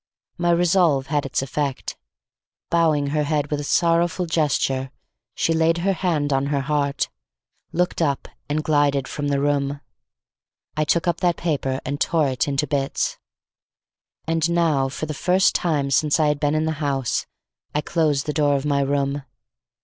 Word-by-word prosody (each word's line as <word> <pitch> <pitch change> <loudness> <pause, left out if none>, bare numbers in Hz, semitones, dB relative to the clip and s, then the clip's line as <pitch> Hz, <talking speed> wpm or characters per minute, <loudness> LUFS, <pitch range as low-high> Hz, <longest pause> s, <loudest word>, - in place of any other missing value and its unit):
My 175 0 +1
resolve 170 -5 +3
had 145 -2 +1
its 135 - -1
effect. 140 0 -3 0.8
Bowing 155 -4 +2
her 150 - +2
head 145 -1 -1
with 150 - 0
a - - -4
sorrowful 170 +3 +2
gesture, 140 -5 0 0.5
she 165 - +1
laid 165 +1 +2
her 195 - +3
hand 160 -5 0
on 135 +1 +1
her 140 -1 0
heart, 140 0 0 0.6
looked 180 0 0
up 140 -4 0 0.2
and 155 +1 0
glided 145 -3 +2
from 145 -1 -3
the 140 -1 +1
room. 140 0 0 1.0
I 155 0 +1
took 170 +4 +1
up 170 -1 +1
that 175 -2 +1
paper 140 -5 -1
and 140 +2 -3
tore 160 -4 +2
it 130 +1 -1
into 140 +1 0
bits. 140 -2 -1 1.1
And 165 0 +1
now 160 -6 +2
for 140 - -4
the 155 - -4
first 185 +6 +2
time 145 -5 0
since 150 +4 +2
I 155 -1 +3
had 150 -1 0
been 145 0 +1
in 155 0 +1
the 160 - 0
house, 135 -4 -1 0.5
I 150 - +2
closed 150 -4 0
the 150 - -2
door 145 -2 +2
of 140 +1 -2
my 140 -1 +2
room. 140 0 0
150 Hz, 170 wpm, -22 LUFS, 140-165 Hz, 1.1 s, resolve